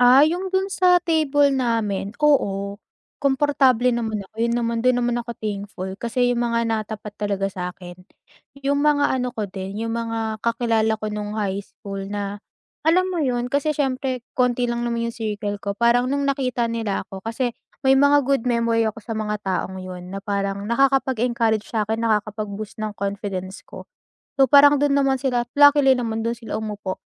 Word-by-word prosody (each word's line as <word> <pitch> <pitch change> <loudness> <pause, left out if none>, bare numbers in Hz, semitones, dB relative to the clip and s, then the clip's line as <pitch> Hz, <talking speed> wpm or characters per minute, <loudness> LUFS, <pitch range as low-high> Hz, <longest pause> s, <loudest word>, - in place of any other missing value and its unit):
Ah, 255 +4 +7
'yung 355 +4 -1
dun 385 +1 -1
sa 365 -1 +5
table 290 -4 +3
namin, 225 -6 -1
oo 200 -9 +1 0.4
komportable 265 -3 +3
naman 225 -2 -2
ako, - - -43
'yun 235 0 +1
naman 230 -1 -1
dun 255 0 +3
naman 240 0 0
ako 235 - -8
thankful, 200 -3 -5
kasi 245 +1 +1
'yung 240 - -1
mga 235 -1 0
natapat 215 -2 -3
talaga 200 -2 -1
sa'kin, 180 -1 -6 0.7
'yung 280 +1 +2
mga 295 -1 +3
ano 250 0 -1
ko 215 - -1
din, 190 +1 -7
'yung 230 - -2
mga 225 -2 -3
kakilala 230 -2 +1
ko 215 - -4
nung 210 0 -4
high 200 -1 -1
school 195 0 -8
na, 205 0 -4 0.4
alam 340 +4 +3
mo 345 - -1
'yun, 245 -3 0
kasi 285 +2 +1
siyempre 260 -3 -1
konti 250 -1 +1
lang 235 0 -2
naman 235 -1 -1
'yung 235 - -5
circle 210 -2 -3
ko, 200 0 -3
parang 240 +2 +3
nung 280 0 0
nakita 255 -3 0
nila 225 -4 -2
ako, 195 - -9
kasi 235 +3 -2 0.3
may 265 - +6
mga 285 0 +5
good 275 -3 +2
memory 230 -1 +2
ako 215 - -13
sa 225 - -5
mga 210 -1 -2
taong 190 0 -2
'yun 180 -1 -8
na 195 - -4
parang 200 -1 -2
nakakapag-encourage 235 -3 +1
sa'kin, 220 0 -1
nakakapag-boost 215 -1 -2
ng 215 - -2
confidence 195 -1 -4
ko. - - -11 0.6
So 270 - +8
parang 285 +2 +7
dun 285 -1 +2
naman 275 -1 +2
sila 250 -2 0
at - - -58
luckily 285 -1 +7
naman 225 -2 -2
dun 235 +1 -1
sila 230 - -6
umupo. 205 -3 -5
230 Hz, 175 wpm, -22 LUFS, 210-265 Hz, 0.7 s, So